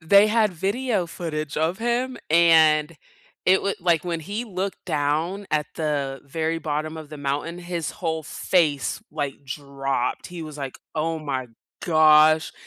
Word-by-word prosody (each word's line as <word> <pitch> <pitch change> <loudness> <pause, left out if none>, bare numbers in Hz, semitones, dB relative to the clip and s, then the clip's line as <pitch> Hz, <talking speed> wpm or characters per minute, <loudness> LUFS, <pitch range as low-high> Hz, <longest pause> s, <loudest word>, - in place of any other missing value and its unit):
they 200 +6 +6
had 215 -3 +3
video 200 +2 -1
footage 155 -3 -4
of 165 +5 0
him, 240 +2 -1
and 160 -1 +5 0.5
it 190 +1 +5
would 200 - -1
like, 170 -2 +2
when 170 -2 -2
he 205 +8 -4
looked 195 -3 -4
down 160 +5 -1
at 150 -1 +1
the 140 -4 -2
very 160 +3 -2
bottom 155 0 -3
of 155 -2 -8
the 155 - -8
mountain, 145 +4 -3
his 175 -2 -3
whole 160 -5 -3
face, 155 -3 0
like, 145 -2 -4
dropped. 135 -2 -3
He 175 -2 -7
was 155 -1 -8
like, 135 -2 -6 0.2
"Oh 160 +1 -1
my 135 -5 -3 0.4
gosh." 155 -1 +5
160 Hz, 150 wpm, -24 LUFS, 150-180 Hz, 0.5 s, they